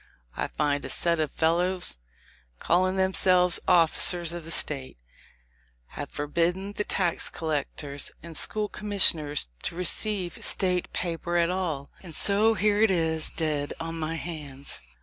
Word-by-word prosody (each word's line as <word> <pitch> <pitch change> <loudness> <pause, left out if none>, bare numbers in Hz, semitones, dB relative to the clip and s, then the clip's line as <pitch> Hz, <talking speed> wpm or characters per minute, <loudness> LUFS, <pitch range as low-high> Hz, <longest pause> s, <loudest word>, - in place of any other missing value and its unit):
I - - -2
find 145 -1 -1
a - - -5
set 170 -1 +1
of 155 -2 0
fellows, 175 - +1 0.6
calling 185 - +1
themselves 185 -1 +2
officers 170 0 +3
of 170 -2 -7
the - - -10
State, 135 - -2 0.9
have 145 - -7
forbid 165 +4 -1
den 195 +2 -7
the 210 - -2
tax 180 -5 -1
collectors 145 -2 -3
and 170 -1 -9
school 210 +6 +3
commissioners 170 - +5
to - - -3
receive 180 0 0
State 180 -2 0
paper 170 0 -3
at 170 0 +2
all; 165 -7 -4
and 170 -4 -10
so 215 +3 +3
here 205 +1 +1
it 220 - +5
is 160 -3 +1
dead 150 -3 -3
on 165 0 -5
my 160 +1 -3
hands. 150 - -7
170 Hz, 145 wpm, -26 LUFS, 155-185 Hz, 0.9 s, commissioners